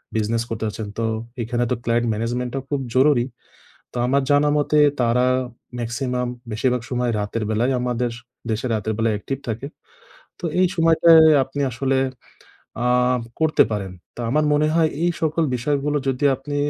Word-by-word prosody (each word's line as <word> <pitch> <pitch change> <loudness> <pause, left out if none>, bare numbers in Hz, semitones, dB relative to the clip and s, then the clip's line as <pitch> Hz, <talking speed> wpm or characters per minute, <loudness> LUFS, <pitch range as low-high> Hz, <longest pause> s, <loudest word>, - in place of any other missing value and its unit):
Business 110 +1 0
করতে 115 -1 -4
চাচ্ছেন, 105 0 -5
তো, 115 - 0 0.4
এখানে 120 +1 -1
তো - - +3
client 120 0 +1
management 120 +3 -2
টা - - 0
খুব 145 -2 -1
জরুরি। 130 -2 +4 0.7
তো, - - -10
আমার 140 +2 +2
জানা 145 +1 +4
মতে, 150 +1 +2 0.2
তারা 120 +1 +2 0.6
maximum 125 +1 -2 0.2
বেশিরভাগ 125 +2 0
সময় 125 -1 0
রাতের 105 +2 -3
বেলায়, 115 +5 +1
আমাদের 125 -1 -1 0.4
দেশে 110 +3 -1
রাতের 110 +1 -2
বেলায় 115 -1 +1
active 135 +5 -5
থাকে। 115 +4 -3 0.7
তো - - -19 0.2
এই 185 - +5
সময়টায় 165 0 +6 0.2
আপনি 135 +2 -5
আসলে 135 +2 0 0.9
আ - - +3 0.5
করতে 160 -1 +4
পারেন। 100 -3 -3 0.2
তো - - -12
আমার 150 +5 +2
মনে 150 +1 +3
হয়, 165 -1 +3
এই 175 - +3
সকল 160 +1 +1
বিষয়গুলো 145 +3 0
যদি 135 +2 -2
আপনি 140 +2 -6
125 Hz, 160 wpm, -22 LUFS, 115-145 Hz, 0.9 s, সময়টায়